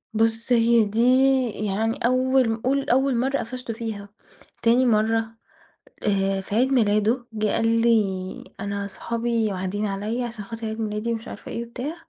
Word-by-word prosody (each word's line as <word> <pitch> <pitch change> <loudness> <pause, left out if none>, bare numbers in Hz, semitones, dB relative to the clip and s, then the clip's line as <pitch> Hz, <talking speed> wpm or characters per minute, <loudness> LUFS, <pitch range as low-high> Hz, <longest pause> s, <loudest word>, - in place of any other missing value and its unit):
بُص 225 +2 +1
هي 235 -1 +4
دي 215 +3 -1 0.5
يعني 215 +2 -2
أول 255 -2 +2
قُل 275 +2 0
أول 265 +1 +3
مرّة 270 +3 +1
قفشته 245 0 -5
فيها 215 -3 -6 0.5
تاني 240 +3 +4
مرّة، 225 0 +2 0.8
آآ، 195 -1 +1
في 200 +2 -5
عيد 260 +3 +3
ميلاده 220 +1 +2
جه 215 0 0
قال 225 +2 +1
لي: 195 -5 +1 0.2
"أنا 200 0 -3
صحابي 230 +2 -1
واعدين 190 +3 -2
عليّا 210 +5 -2
علشان 225 -4 -7
خاطر 230 0 -6
عيد 220 +1 -5
ميلادي 215 +2 -2
مش 225 0 -6
عارفة - - -9
إيه 235 +1 -4
وبتاع" 255 +7 -5
225 Hz, 155 wpm, -24 LUFS, 210-240 Hz, 0.8 s, هي